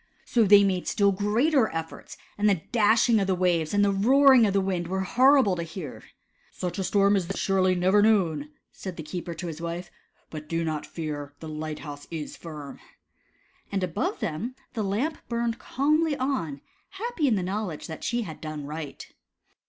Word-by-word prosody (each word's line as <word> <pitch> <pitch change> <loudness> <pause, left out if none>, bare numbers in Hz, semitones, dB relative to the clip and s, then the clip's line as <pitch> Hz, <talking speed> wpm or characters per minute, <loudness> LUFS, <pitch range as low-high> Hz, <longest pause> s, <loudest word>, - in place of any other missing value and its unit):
So 230 -3 +3
they 200 0 +7
made 185 -2 0
still 200 -1 +3
greater 220 +7 +2
efforts, 165 0 -7 0.2
and 210 +1 +2
the 185 -5 +1
dash 225 0 +4
ing 230 -2 +4
of 195 - 0
the 190 - +2
waves 175 -3 +1
and 205 0 +3
the 200 - +3
roaring 260 +3 +6
of 195 - 0
the 200 - +3
wind 185 -3 -1
were 190 +2 -1
horrible 255 0 +4
to 170 - -3
hear. 165 -3 -7 0.3
" - - -39
Such 180 0 -4
a - - 0
storm 200 +1 +3
as 185 -4 0
this - - -4
was - - -4
surely 185 -1 +2
never 185 +3 +3
known," 170 -9 +2 0.2
said 185 -3 -8
the 160 - -5
keeper 170 +1 -5
to 175 - -6
his 165 -1 -6
wife, 170 +1 -5 0.2
" - - -39
but 155 -1 -8
do 165 0 -1
not 155 -2 -3
fear, 145 -3 -5
the 160 - -8
light 155 0 -5
house 145 -1 -8
is 160 -3 -6
firm." 150 -4 -9 0.9
And 195 -2 -1
above 175 -3 -2
them 220 +11 -3 0.2
the 220 - -2
Lamp 220 +11 -1
burned 235 -1 -1
calmly 305 +2 +1
on, 255 - -2 0.3
happy 390 -6 -2
in 235 - +3
the 190 - -1
knowl 200 +2 -2
edge 155 - -7
that 160 - -8
she 240 0 0
had 160 -7 -9
done 155 -2 -5
right. 150 -1 -7
190 Hz, 205 wpm, -26 LUFS, 160-220 Hz, 0.9 s, they